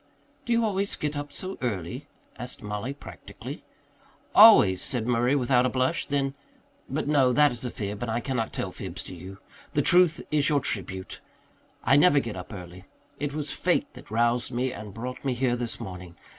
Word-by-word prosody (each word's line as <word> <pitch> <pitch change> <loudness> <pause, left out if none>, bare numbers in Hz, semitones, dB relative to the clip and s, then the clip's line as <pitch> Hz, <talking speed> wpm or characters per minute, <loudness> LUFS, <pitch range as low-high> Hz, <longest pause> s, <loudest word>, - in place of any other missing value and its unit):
"Do - - -1
you 230 0 +3
always 200 -1 0
get 150 0 -3
up 145 0 -5
so 190 +1 -4
early?" 120 - -3 0.3
asked 125 -1 -7
Mollie 105 +6 -4
practically. - - -10 0.7
"Always," 95 -1 +8
said 120 -4 -2
Murray 120 +3 +2
without 125 -2 +3
a 130 - +2
blush. 130 +6 0
Then 140 -1 0 0.6
"But 140 +2 -2
no, 140 -4 +4
that 150 +1 +5
is 120 0 -6
a - - -1
fib, 105 -2 -5
and 120 - -2
I 115 +1 0
cannot 120 -3 -2
tell - - -3
fibs - - -6
to - - -9
you. 95 +3 -10 0.4
The - - +2
truth 175 -2 +4
is 150 -2 +3
your 145 -2 +3
tribute. 95 -4 -4 0.6
I 135 - +5
never 145 -1 +6
get 115 -5 -5
up 90 +3 -8
early. 90 -2 -9 0.3
It 145 0 -3
was 150 -1 -2
fate - - 0
that - - -13
roused 120 +3 +1
me 125 +1 -1
and 105 -2 -8
brought 125 +5 -6
me 135 -3 0
here 120 0 +1
this 115 -3 -3
morning. 90 -2 -8
125 Hz, 190 wpm, -27 LUFS, 105-145 Hz, 0.7 s, Always